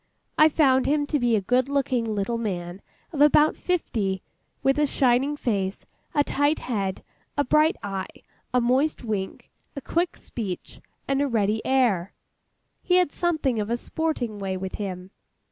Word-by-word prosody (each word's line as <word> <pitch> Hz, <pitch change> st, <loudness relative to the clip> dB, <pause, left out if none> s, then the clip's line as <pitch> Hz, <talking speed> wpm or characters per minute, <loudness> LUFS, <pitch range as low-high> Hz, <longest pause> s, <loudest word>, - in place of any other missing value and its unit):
I 310 Hz, +1 st, +6 dB
found 265 Hz, -4 st, +3 dB
him 290 Hz, 0 st, +2 dB
to 295 Hz, 0 st, 0 dB
be 240 Hz, -2 st, +2 dB
a 210 Hz, -, +1 dB
good 250 Hz, +6 st, +1 dB
looking 250 Hz, -6 st, 0 dB
little 210 Hz, +4 st, -1 dB
man 180 Hz, -4 st, -4 dB, 0.3 s
of 290 Hz, -, -1 dB
about 300 Hz, +1 st, +5 dB
fifty, 210 Hz, -, -1 dB, 0.4 s
with 270 Hz, +2 st, +3 dB
a 300 Hz, -, +3 dB
shining 270 Hz, +3 st, +2 dB
face, 195 Hz, -7 st, -2 dB, 0.3 s
a 290 Hz, -, +4 dB
tight 290 Hz, +2 st, +1 dB
head, 200 Hz, -6 st, -3 dB, 0.3 s
a 290 Hz, -, +3 dB
bright 305 Hz, +4 st, +3 dB
eye, 195 Hz, -2 st, -3 dB, 0.4 s
a 250 Hz, -, +3 dB
moist 260 Hz, +6 st, +1 dB
wink, 205 Hz, -4 st, -4 dB, 0.2 s
a -, -, -3 dB
quick 340 Hz, +6 st, -1 dB
speech, 200 Hz, -7 st, -6 dB, 0.3 s
and 275 Hz, 0 st, +1 dB
a 285 Hz, -, +2 dB
ready 220 Hz, -3 st, 0 dB
air. 235 Hz, -9 st, +1 dB, 0.7 s
He 360 Hz, -, +2 dB
had 360 Hz, -4 st, +3 dB
something 310 Hz, -9 st, 0 dB
of 210 Hz, 0 st, -2 dB
a 235 Hz, -, 0 dB
sporting 245 Hz, -7 st, -3 dB
way 190 Hz, -1 st, -2 dB
with 190 Hz, 0 st, -5 dB
him. 185 Hz, -1 st, -5 dB
245 Hz, 160 wpm, -25 LUFS, 200-290 Hz, 0.7 s, I